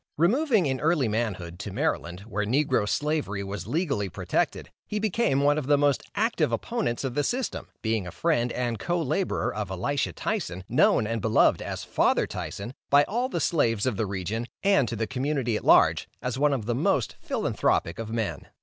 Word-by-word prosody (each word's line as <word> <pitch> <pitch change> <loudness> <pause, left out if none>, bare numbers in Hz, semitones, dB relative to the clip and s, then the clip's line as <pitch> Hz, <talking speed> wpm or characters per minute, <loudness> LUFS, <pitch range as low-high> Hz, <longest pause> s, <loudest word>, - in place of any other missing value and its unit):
Removing 220 - +3
in 130 -2 -1
early 150 -3 +2
manhood, 95 -6 -3
to 105 - -5
Maryland, 100 - -2
where 105 0 -3
negro 125 -2 +1
Slavery 145 -10 -1
was 100 -1 -6
legally 140 - -1
protected, 85 - -2 0.2
he 210 - -3
became 210 - +1
one 145 +1 +3
of 140 - -5
the 145 0 +5
most 145 -2 +2
active 225 +3 +1
opponents 225 - -2
of 130 -2 -2
the 145 +2 +1
system, 250 - -2 0.2
being 110 -4 0
a - - -6
friend 125 - +1
and 120 -3 -2
co 175 - -1
laborer 170 +5 -1
of 105 -3 -4
Elisha 120 +9 -1
Tyson, 90 +1 -3
known 110 - +3
and 115 0 -2
beloved 110 +2 +3
as - - -5
"Father - - +2
Tyson," 100 +6 -6 0.2
by 145 +1 +6
all 240 - -1
the - - -2
slaves 115 - +1
of 130 -4 0
the 105 +1 -1
region, 100 +5 -3 0.2
and 195 -10 +4
to 115 - -3
the 115 +1 -1
community 130 -2 -1
at - - -3
large, - - +5
as 125 -1 -3
one 145 +2 +3
of 130 -6 -1
the 120 - 0
most 120 - +1
philanthropic 85 +4 0
of 115 -1 -5
men. 110 -2 -3
125 Hz, 190 wpm, -26 LUFS, 105-150 Hz, 0.2 s, by